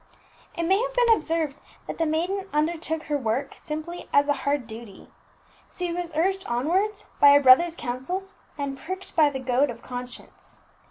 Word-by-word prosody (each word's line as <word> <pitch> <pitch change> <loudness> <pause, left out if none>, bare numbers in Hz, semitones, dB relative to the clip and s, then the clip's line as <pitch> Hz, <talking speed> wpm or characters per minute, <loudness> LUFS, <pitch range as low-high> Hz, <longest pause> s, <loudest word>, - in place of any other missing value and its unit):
It 340 - -1
may 380 +5 +3
have - - -3
been 480 -2 +5
observed 320 -6 -1 0.3
that - - -7
the 325 - +2
maiden 370 +5 -1
undertook 320 +1 -1
her 295 -1 -1
work 235 +2 -2
simply 315 +3 -7
as 285 0 +4
a - - +5
hard 285 -2 -1
duty. 220 -3 -11 0.6
She 355 -1 -3
was 350 -1 -4
urged 380 +4 +1
onwards 375 - -1
by 285 0 +8
a - - +7
brother's 290 +6 +6
counsels, 355 +12 -4 0.2
and 275 -2 -4
pricked 375 +3 -7
by 305 -3 +5
the 275 - -5
goad 260 +2 +1
of 235 -1 -8
conscience. 245 0 -9
310 Hz, 170 wpm, -25 LUFS, 270-355 Hz, 0.6 s, by